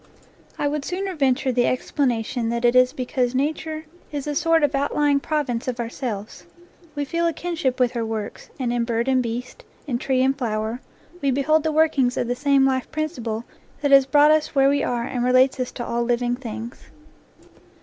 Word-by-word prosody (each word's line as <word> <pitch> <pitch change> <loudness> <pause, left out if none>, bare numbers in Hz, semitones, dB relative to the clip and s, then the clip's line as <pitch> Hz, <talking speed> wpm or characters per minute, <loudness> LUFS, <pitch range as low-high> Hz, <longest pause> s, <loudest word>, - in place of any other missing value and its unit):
I 290 - 0
would 295 0 -2
sooner 375 +4 -3
venture 270 -3 +1
the 245 -1 +2
explanation 245 -3 -1
that 235 +1 -1
it 240 +1 +4
is 255 0 +5
because 250 0 -2
nature 310 +3 -2 0.3
is 285 -2 -4
a 295 - -2
sort 330 +1 +2
of 290 0 +2
outlying 285 +1 +2
province 275 -6 -2
of 250 -1 -3
ourselves. 230 -3 -5 0.5
We 290 0 -2
feel 335 +4 0
a 335 - 0
kinship 315 -7 -2
with 250 -1 +3
her 235 -2 -2
works, 220 -2 -5
and 245 -2 -1
in 240 -1 +1
bird 235 +1 -1
and 260 -1 +3
beast, 245 - -5 0.2
in 245 -5 -2
tree 260 -1 +1
and 270 +1 +2
flower, 225 -1 -3 0.4
we 280 - +1
behold 280 +4 +2
the 315 - 0
workings 295 -5 +2
of 240 - 0
the 245 - -1
same 275 0 +3
life 260 -1 0
principle 240 -8 -3 0.4
that 285 -1 +1
has 275 -1 +7
brought 295 +2 +5
us 310 -1 +1
where 275 0 +5
we 285 0 +2
are 240 -1 -1
and 245 0 -2
relates 255 +2 +4
us 255 - -2
to 240 - -5
all 235 0 -1
living 240 0 0
things. 235 -2 -8
260 Hz, 195 wpm, -23 LUFS, 240-290 Hz, 0.5 s, has